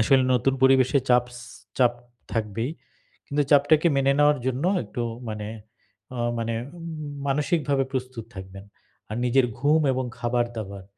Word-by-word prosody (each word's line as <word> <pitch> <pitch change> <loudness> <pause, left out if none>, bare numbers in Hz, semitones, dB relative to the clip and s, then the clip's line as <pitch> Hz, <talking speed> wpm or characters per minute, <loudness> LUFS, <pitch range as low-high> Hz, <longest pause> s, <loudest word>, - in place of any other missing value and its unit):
আসলে 130 +3 +4
নতুন 130 +2 +2
পরিবেশে 130 +1 +5
চাপস 125 0 +2 0.4
চাপ 125 -2 +5 0.4
থাকবেই। 115 +3 -2 0.6
কিন্তু 145 +1 +1
চাপটাকে 150 +3 +5
মেনে 135 0 +3
নেওয়ার 145 0 +5
জন্য 130 +2 -1 0.2
একটু 120 - -5 0.3
মানে 105 -1 -5 0.7
আ - - -3 0.2
মানে 115 0 -2 0.2
উ - - -11 0.5
মানসিকভাবে 145 -1 +1
প্রস্তুত 130 -3 -4
থাকবেন। 95 +1 -9 0.4
আর 110 - -4
নিজের 125 +1 +4
ঘুম, 150 +3 +3
এবং 130 +1 -1 0.2
খাবার-দাবার 120 -5 -2
130 Hz, 130 wpm, -25 LUFS, 115-140 Hz, 0.7 s, পরিবেশে